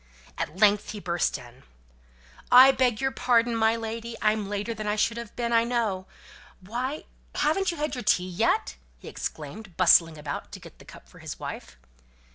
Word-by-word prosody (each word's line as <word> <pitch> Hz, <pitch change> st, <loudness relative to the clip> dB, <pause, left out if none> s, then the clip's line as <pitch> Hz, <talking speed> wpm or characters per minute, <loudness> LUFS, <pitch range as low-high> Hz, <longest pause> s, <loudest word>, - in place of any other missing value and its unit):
At 155 Hz, -, -5 dB
length 210 Hz, 0 st, +3 dB
he 210 Hz, -, -6 dB
burst 175 Hz, -5 st, -1 dB
in: 125 Hz, 0 st, -15 dB, 0.9 s
"I 255 Hz, +2 st, +9 dB
beg 250 Hz, -5 st, +1 dB
your 270 Hz, 0 st, 0 dB
pardon, 240 Hz, -2 st, +2 dB
my 220 Hz, 0 st, +3 dB
lady, 230 Hz, +1 st, -5 dB
I'm 215 Hz, -2 st, 0 dB
later 205 Hz, +3 st, -3 dB
than 215 Hz, -1 st, -6 dB
I 210 Hz, -, +1 dB
should 225 Hz, +2 st, 0 dB
have 235 Hz, -2 st, -8 dB
been, 235 Hz, -1 st, -2 dB
I 230 Hz, 0 st, +5 dB
know. 225 Hz, -6 st, -1 dB, 0.5 s
Why! 245 Hz, +9 st, -4 dB, 0.3 s
haven't 340 Hz, +6 st, +1 dB
you 340 Hz, -, -3 dB
had 300 Hz, +1 st, -2 dB
your 250 Hz, -, -4 dB
tea 180 Hz, -3 st, +2 dB
yet?" 175 Hz, -, 0 dB, 0.2 s
he -, -, -14 dB
exclaimed, 175 Hz, +5 st, -7 dB
bustling 165 Hz, -3 st, +5 dB
about 145 Hz, -1 st, -6 dB
to -, -, -7 dB
get -, -, -15 dB
the -, -, -15 dB
cup -, -, -14 dB
for -, -, -17 dB
his -, -, -7 dB
wife. 65 Hz, -1 st, -8 dB
220 Hz, 185 wpm, -26 LUFS, 185-240 Hz, 0.9 s, I